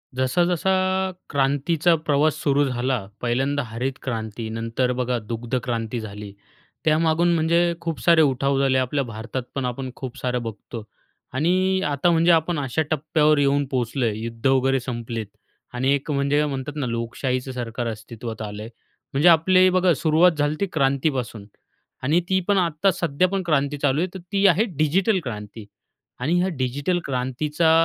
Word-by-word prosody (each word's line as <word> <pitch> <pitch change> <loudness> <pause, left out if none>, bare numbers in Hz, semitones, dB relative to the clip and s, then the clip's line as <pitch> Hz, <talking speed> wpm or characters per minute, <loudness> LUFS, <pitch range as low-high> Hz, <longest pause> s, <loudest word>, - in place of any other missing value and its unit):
जसा-जसा 175 +8 +1 0.6
क्रांतीचा 145 +5 +2
प्रवास 155 -1 +1
सुरू 145 0 +3
झाला, 125 -3 -1 0.2
पहिल्यांदा 135 +4 0
हरित 120 +4 -3
क्रांती, 110 -2 -4
नंतर 115 +3 -1
बघा 125 0 0
दुग्ध 115 +3 -4
क्रांती 115 -1 -2
झाली, 105 -2 -8 0.5
त्यामागून 160 +2 +3
म्हणजे 170 +2 +2
खूप 165 -2 -3
सारे 170 -2 +5
उठाव 135 -1 +2
झाले. 135 -1 +2
आपल्या 130 +2 0
भारतात 115 +2 -5
पण 135 -2 -1
आपण 130 +1 -4
खूप 130 -3 -7
सारं 125 -1 -2
बघतो 115 +1 -7 0.5
आणि 185 +6 +1
आता 145 +3 +1
म्हणजे 170 +1 +4
आपण 165 0 +2
अशा 135 +2 -1
टप्प्यावर 155 0 +2
येऊन 140 0 +2
पोहोचलो 125 0 -1
आहे, 110 -2 0
युद्ध 115 +2 -3
वगैरे 135 0 +3
संपलेत 120 -2 -5 0.5
आणि 130 +2 +1
एक 140 +2 -2
म्हणजे 140 +1 +1
म्हणतात 140 0 -4
ना, 145 -3 -2
लोकशाहीचं 125 +3 -2
सरकार 120 -1 -4
अस्तित्वात 115 0 -7
आलं 105 -1 -6
आहे, 110 - -8 0.4
म्हणजे 145 +6 +5
आपले 185 +3 +5
बघा 185 -1 +3
सुरुवात 160 +5 +4
झाली 145 +1 +1
ती 200 - +1
क्रांतीपासून 135 -6 0 0.6
आणि 150 +6 +3
ती 190 0 +3
पण 205 -1 +3
आत्ता 175 +1 +2
सध्या 170 -1 0
पण 195 0 -2
क्रांती 145 -3 +1
चालू 145 0 +1
आहे. 180 - +1
तर 190 - -7
ती 200 0 +2
आहे 190 +3 +4
डिजिटल 185 +7 +2
क्रांती 105 -2 -7 0.5
आणि 140 +7 0
ह्या 180 - +1
डिजिटल 140 +8 -1
क्रांतीचा 140 +5 0
140 Hz, 155 wpm, -23 LUFS, 120-160 Hz, 0.6 s, सारे